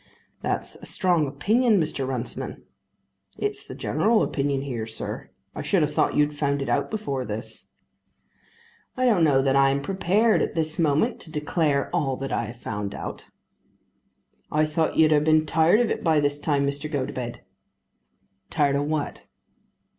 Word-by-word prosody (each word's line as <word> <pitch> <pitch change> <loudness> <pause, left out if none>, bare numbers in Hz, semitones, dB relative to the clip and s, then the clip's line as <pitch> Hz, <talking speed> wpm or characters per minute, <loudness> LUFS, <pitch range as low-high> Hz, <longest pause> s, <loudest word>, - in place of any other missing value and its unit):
"That's - - -2
a - - -12
strong 175 -5 +1
opinion, 215 - +2
Mr. 150 -4 -2
Runciman." 125 -2 -4 0.7
"It's 415 0 -3
the - - -8
general 225 0 +2
opinion 140 -1 -1
here, 120 -5 -4
sir. 110 - -6 0.2
I - - -5
should 185 -5 +2
have 150 0 -1
thought - - +1
you'd 150 0 +2
found 140 -1 0
it - - -5
out - - +1
before 140 -12 -3
this." 110 0 -7 1.3
"I 255 - +2
don't 210 -9 +4
know 135 -4 +4
that 135 0 +2
I 135 0 +5
am 140 +1 +1
prepared 195 +5 +2
at - - -2
this 160 0 -2
moment 160 - +2
to 160 - -10
declare 150 -2 0
all 135 -6 0
that 135 0 -5
I - - 0
have 115 +3 -9
found 105 -3 -4
out." - - -7 1.2
"I 155 +1 +3
thought 155 +1 -1
you'd 155 -1 +5
have 150 -1 +4
been 155 0 +4
tired 160 +6 +4
of 235 - +1
it - - -2
by 160 -3 +3
this 145 0 0
time, 145 -2 +1
Mr. 140 +2 -3
Gotobed." 130 -4 -3 1.1
"Tired 145 -3 +2
of 145 - 0
what?" 155 -1 -3
150 Hz, 170 wpm, -25 LUFS, 140-165 Hz, 1.3 s, I